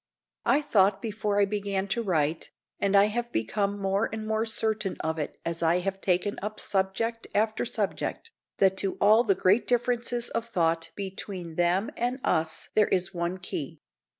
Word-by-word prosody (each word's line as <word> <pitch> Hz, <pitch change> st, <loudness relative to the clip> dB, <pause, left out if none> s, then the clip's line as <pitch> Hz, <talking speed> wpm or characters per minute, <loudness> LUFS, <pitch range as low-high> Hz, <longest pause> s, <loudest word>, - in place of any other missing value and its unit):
I 290 Hz, +3 st, +4 dB
thought 195 Hz, -6 st, +3 dB
before 210 Hz, -1 st, -1 dB
I 200 Hz, -, +5 dB
began 200 Hz, -1 st, -2 dB
to 235 Hz, +4 st, 0 dB
write, 160 Hz, -6 st, 0 dB, 0.3 s
and 200 Hz, 0 st, +1 dB
I 200 Hz, -, +8 dB
have 235 Hz, +3 st, -2 dB
become 200 Hz, -, -1 dB
more 195 Hz, +2 st, 0 dB
and 220 Hz, -1 st, -5 dB
more 220 Hz, +1 st, 0 dB
certain 220 Hz, -3 st, 0 dB
of 160 Hz, 0 st, -2 dB
it 150 Hz, -, -4 dB
as 170 Hz, 0 st, -2 dB
I 170 Hz, +2 st, +3 dB
have 195 Hz, +1 st, -3 dB
taken 185 Hz, +2 st, +1 dB
up 210 Hz, +2 st, -5 dB
subject 205 Hz, +4 st, -1 dB
after 220 Hz, +3 st, +1 dB
subject, 225 Hz, -, -2 dB, 0.3 s
that 190 Hz, -1 st, +3 dB
to 195 Hz, 0 st, -1 dB
all 215 Hz, +3 st, +6 dB
the 200 Hz, -5 st, +2 dB
great 195 Hz, +6 st, +3 dB
differences 240 Hz, 0 st, 0 dB
of 230 Hz, 0 st, -2 dB
thought 165 Hz, -5 st, 0 dB
between 190 Hz, -3 st, -6 dB
them 175 Hz, +5 st, +1 dB
and 245 Hz, +2 st, -1 dB
us 160 Hz, 0 st, 0 dB
there 215 Hz, -1 st, +4 dB
is 185 Hz, +1 st, 0 dB
one 175 Hz, +1 st, -2 dB
key. 170 Hz, -6 st, -5 dB
200 Hz, 175 wpm, -27 LUFS, 180-220 Hz, 0.3 s, I